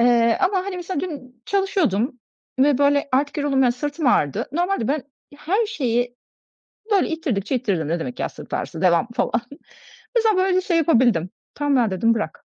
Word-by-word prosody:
Eee, 235 Hz, -1 st, +4 dB
ama 380 Hz, +1 st, +2 dB
hani 370 Hz, 0 st, -4 dB
mesela 355 Hz, -3 st, -3 dB
dün 260 Hz, -8 st, -8 dB
çalışıyordum 310 Hz, -, 0 dB, 0.4 s
ve, 275 Hz, 0 st, +4 dB
böyle, 285 Hz, 0 st, +2 dB
artık 285 Hz, +2 st, +1 dB
yoruldum, 275 Hz, -2 st, +2 dB
ya, 245 Hz, -, +4 dB
sırtım 290 Hz, +4 st, -3 dB
ağrıdı. 145 Hz, -, +2 dB
Normalde 350 Hz, -, 0 dB
ben 290 Hz, -1 st, 0 dB, 0.3 s
her 390 Hz, +10 st, 0 dB
şeyi 245 Hz, -, -1 dB, 0.8 s
böyle 390 Hz, -, +3 dB
ittirdikçe 270 Hz, -, -2 dB
ittiririm. 180 Hz, -10 st, -1 dB
"Ne 170 Hz, +1 st, 0 dB
demek 250 Hz, +8 st, -5 dB
ya -, -, 0 dB
sırt -, -, -9 dB
ağrısı, -, -, -4 dB
devam." 180 Hz, +5 st, +3 dB
falan. 235 Hz, -, 0 dB, 0.8 s
Mesela 445 Hz, -4 st, +3 dB
böyle 370 Hz, 0 st, +2 dB
şey 355 Hz, -3 st, 0 dB
yapabildim. 240 Hz, -, +3 dB, 0.3 s
"Tamam 290 Hz, -1 st, +1 dB
ya!" 220 Hz, -, -1 dB
dedim, 230 Hz, +5 st, +2 dB
"Bırak." 220 Hz, -, -5 dB
275 Hz, 170 wpm, -22 LUFS, 235-345 Hz, 0.8 s, Eee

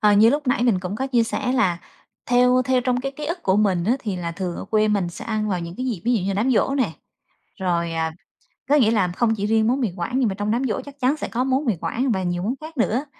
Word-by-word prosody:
À, 210 Hz, -1 st, +5 dB
như 220 Hz, +3 st, +6 dB
lúc 290 Hz, +1 st, -1 dB
nãy 245 Hz, -1 st, +2 dB
mình 220 Hz, -7 st, +2 dB
cũng 185 Hz, +2 st, -4 dB
có 265 Hz, -, -2 dB
chia 245 Hz, -3 st, +2 dB
sẻ 250 Hz, +3 st, -1 dB
là 190 Hz, -10 st, +2 dB, 0.5 s
theo 250 Hz, +1 st, +4 dB
theo 255 Hz, 0 st, +2 dB
trong 250 Hz, 0 st, 0 dB
cái 275 Hz, +1 st, -4 dB
ký 300 Hz, +2 st, -7 dB
ức 345 Hz, +3 st, -4 dB
của 190 Hz, 0 st, +2 dB
mình 190 Hz, -5 st, +2 dB
á 220 Hz, -, +3 dB
thì 210 Hz, -7 st, -3 dB
là 170 Hz, -1 st, -4 dB
thường 180 Hz, -1 st, -4 dB
ở -, -, -6 dB
quê 215 Hz, -1 st, +2 dB
mình 200 Hz, -4 st, +1 dB
sẽ 170 Hz, -, -8 dB
ăn 215 Hz, -1 st, -1 dB
vào 185 Hz, -3 st, -1 dB
những 170 Hz, +1 st, -6 dB
cái 255 Hz, -, -3 dB
dịp, 225 Hz, -8 st, -2 dB
ví 245 Hz, -, +2 dB
dụ 225 Hz, -, +1 dB
như 190 Hz, -, -2 dB
là 195 Hz, -, 0 dB
đám 220 Hz, +7 st, +1 dB
giỗ 270 Hz, +4 st, +2 dB
nè, 250 Hz, -11 st, 0 dB, 0.7 s
rồi, 170 Hz, -3 st, 0 dB
à, 160 Hz, 0 st, -1 dB, 0.6 s
có 290 Hz, -, +4 dB
nghĩa 240 Hz, -7 st, +4 dB
là 205 Hz, -5 st, +2 dB
không 225 Hz, -2 st, +2 dB
chỉ 205 Hz, -1 st, -2 dB
riêng 220 Hz, 0 st, +2 dB
món 260 Hz, +3 st, +1 dB
mì 235 Hz, -6 st, 0 dB
Quảng 210 Hz, +9 st, -2 dB
nhưng 245 Hz, -, +2 dB
mà 195 Hz, -, -2 dB
trong 205 Hz, +1 st, -2 dB
đám 240 Hz, +4 st, 0 dB
giỗ 245 Hz, -, -1 dB
chắc 285 Hz, 0 st, -13 dB
chắn 260 Hz, +4 st, +2 dB
sẽ -, -, -5 dB
có 245 Hz, +2 st, -1 dB
món 265 Hz, +2 st, +1 dB
mì 220 Hz, -6 st, +1 dB
Quảng 250 Hz, +1 st, -1 dB
và 190 Hz, -, -1 dB
nhiều 175 Hz, -1 st, -2 dB
món 225 Hz, +7 st, -1 dB
khác 315 Hz, +1 st, -10 dB
nữa. 240 Hz, +2 st, +1 dB
225 Hz, 300 wpm, -22 LUFS, 190-255 Hz, 0.7 s, như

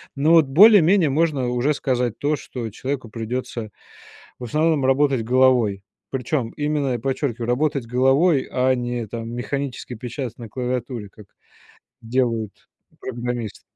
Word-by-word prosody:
Но 145 Hz, +3 st, +2 dB
вот 165 Hz, -2 st, +6 dB
более-менее 185 Hz, +1 st, +6 dB
можно 145 Hz, -3 st, +1 dB
уже 125 Hz, +5 st, +1 dB
сказать 125 Hz, -4 st, -1 dB
то, 150 Hz, +1 st, +1 dB
что 120 Hz, -5 st, -6 dB
человеку 130 Hz, +2 st, -5 dB
придётся 115 Hz, 0 st, -5 dB, 0.7 s
в -, -, -8 dB
основном 155 Hz, +3 st, +1 dB
работать 135 Hz, -2 st, +2 dB
головой. 120 Hz, -5 st, +3 dB, 0.3 s
Причём 130 Hz, -1 st, -2 dB
именно, 145 Hz, -4 st, -1 dB
подчёркиваю, 125 Hz, -2 st, -2 dB
работать 135 Hz, +1 st, 0 dB
головой, 135 Hz, +5 st, +3 dB
а 130 Hz, 0 st, +2 dB
не 120 Hz, -1 st, -3 dB
там 115 Hz, +1 st, -6 dB
механически 125 Hz, +2 st, -4 dB
печатать 120 Hz, +1 st, -6 dB
на 115 Hz, -2 st, -8 dB
клавиатуре, 125 Hz, -3 st, -4 dB
как 105 Hz, -, -15 dB, 0.8 s
делают 115 Hz, -3 st, -2 dB, 0.3 s
программисты. 120 Hz, -3 st, -5 dB
125 Hz, 125 wpm, -22 LUFS, 120-140 Hz, 0.8 s, вот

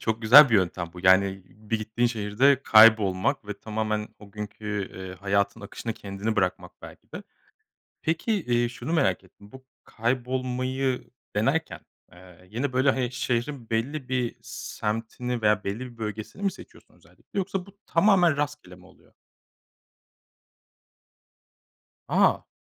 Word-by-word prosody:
çok 110 Hz, +1 st, -2 dB
güzel 135 Hz, +5 st, +9 dB
bir 115 Hz, -, +3 dB
yöntem 90 Hz, -3 st, 0 dB
bu. 90 Hz, -, -10 dB
Yani 95 Hz, 0 st, +4 dB
bir 110 Hz, +2 st, -4 dB
gittiğin 110 Hz, +3 st, 0 dB
şehirde 120 Hz, +5 st, +2 dB
kaybolmak 110 Hz, +2 st, +5 dB
ve 105 Hz, -, -5 dB
tamamen 110 Hz, -1 st, -3 dB
o 105 Hz, -1 st, -15 dB
günkü, 105 Hz, -1 st, -5 dB
eee, 95 Hz, -1 st, -7 dB
hayatın 100 Hz, +2 st, 0 dB
akışına 105 Hz, +2 st, -6 dB
kendini 100 Hz, +2 st, -4 dB
bırakmak, 95 Hz, -3 st, -1 dB
belki -, -, -13 dB
de. -, -, -7 dB, 0.8 s
Peki, 165 Hz, +8 st, -1 dB, 0.2 s
iii, 120 Hz, 0 st, +2 dB
şunu 125 Hz, +6 st, -5 dB
merak 130 Hz, -, +1 dB
ettim, 100 Hz, +2 st, -19 dB
bu 130 Hz, 0 st, -14 dB, 0.2 s
kaybolmayı 130 Hz, +2 st, -2 dB, 0.3 s
denerken, 135 Hz, +10 st, 0 dB, 0.3 s
eee, 90 Hz, 0 st, -17 dB
yine, 125 Hz, +4 st, -2 dB
böyle, 130 Hz, +1 st, +3 dB
he 125 Hz, -2 st, -1 dB
şehrin 125 Hz, 0 st, -3 dB
belli 130 Hz, +4 st, -2 dB
bir 125 Hz, -2 st, -1 dB
semtini 115 Hz, +3 st, -4 dB
veya 105 Hz, -1 st, +2 dB
belli 100 Hz, +3 st, -3 dB
bir 125 Hz, -2 st, -9 dB
bölgesini 110 Hz, -, -6 dB
mi 200 Hz, -1 st, +1 dB
seçiyorsun 185 Hz, -, -16 dB
özellikle? -, -, -25 dB, 0.2 s
Yoksa 190 Hz, -1 st, -3 dB
bu 200 Hz, 0 st, -18 dB
tamamen 175 Hz, -4 st, +4 dB
rastgele 145 Hz, -11 st, -4 dB
mi 90 Hz, 0 st, -18 dB
oluyor? 95 Hz, -, -22 dB, 3.0 s
A! -, -, +3 dB
115 Hz, 135 wpm, -26 LUFS, 105-130 Hz, 3.0 s, güzel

